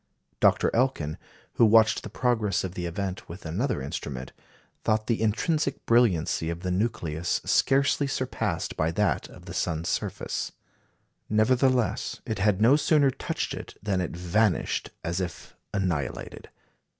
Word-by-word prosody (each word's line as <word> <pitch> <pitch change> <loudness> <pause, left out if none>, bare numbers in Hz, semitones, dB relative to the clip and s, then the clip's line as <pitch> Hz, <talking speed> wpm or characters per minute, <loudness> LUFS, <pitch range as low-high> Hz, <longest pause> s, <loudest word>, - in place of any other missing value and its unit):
Dr. - - +4
Elkin, 115 - 0 0.4
who 115 - +7
watched 110 0 +5
the - - -8
progress 110 -5 0
of 95 -2 -4
the 90 -2 -3
event 95 +2 -4
with 85 +3 -9
another 100 - -1
instrument, 65 -2 -5 0.5
thought 110 0 +1
the 115 -1 0
intrinsic 140 +7 0
brilliancy 95 -9 +2
of 85 0 -4
the 90 -1 -2
nucleus 90 -5 -1
scarcely 140 +1 +3
surpassed 130 -1 -2
by 80 - +1
that 90 -4 0
of - - -14
the - - -7
sun's 85 0 -1
surface. - - -3 0.8
Nevertheless 125 +3 +2
it 110 -3 -3
had 100 -1 +2
no 115 +6 +6
sooner 145 -2 +3
touched - - -3
it - - -8
than 100 -3 0
it 90 - -4
vanished 90 +2 +1
as 85 +3 -1
if 90 -2 -6 0.2
annihilated. 85 -9 -3
105 Hz, 140 wpm, -27 LUFS, 85-120 Hz, 0.8 s, who